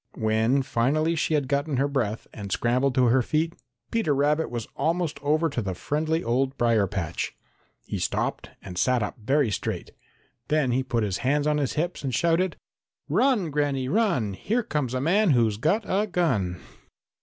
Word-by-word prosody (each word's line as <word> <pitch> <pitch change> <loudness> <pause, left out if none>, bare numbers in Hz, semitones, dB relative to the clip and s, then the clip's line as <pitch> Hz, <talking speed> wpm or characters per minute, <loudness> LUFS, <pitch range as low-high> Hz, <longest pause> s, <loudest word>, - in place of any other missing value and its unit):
When 110 +5 +2
finally 150 +8 +1
she 160 0 +1
had 145 -3 0
gotten 140 0 0
her 140 +2 +2
breath 120 -6 -2
and 100 -2 -7
scrambled 125 +5 +1
to 130 -2 +4
her 125 +2 +4
feet, 160 +5 0 0.4
Peter 220 -11 +1
Rabbit 150 +3 +1
was 120 -2 -4
almost 165 -3 -1
over 155 +3 +2
to 130 -5 -2
the 95 -3 -3
friendly 155 - -1
old 130 +3 0
brier 115 -4 +3
patch. 85 -3 -3 0.5
He - - -4
stopped - - -2
and 90 -2 -6
sat 125 -3 +2
up 105 - -5
very 135 -1 +2
straight. - - -3 0.6
Then 150 -4 +2
he 130 +2 +2
put 120 -3 -1
his 100 -3 -1
hands 145 +3 +1
on 150 0 +2
his 140 -4 -1
hips 170 0 -2
and 130 -4 -1
shouted: 170 +4 +1 0.5
"Run, 235 - +2
Granny, 140 -3 0
run! 155 - +1
Here 230 - -1
comes 145 - -2
a 130 - -1
man 190 +7 +3
who's 110 -3 +2
got 170 - +1
a 205 +3 0
gun!" 120 - 0
140 Hz, 180 wpm, -26 LUFS, 120-160 Hz, 0.6 s, to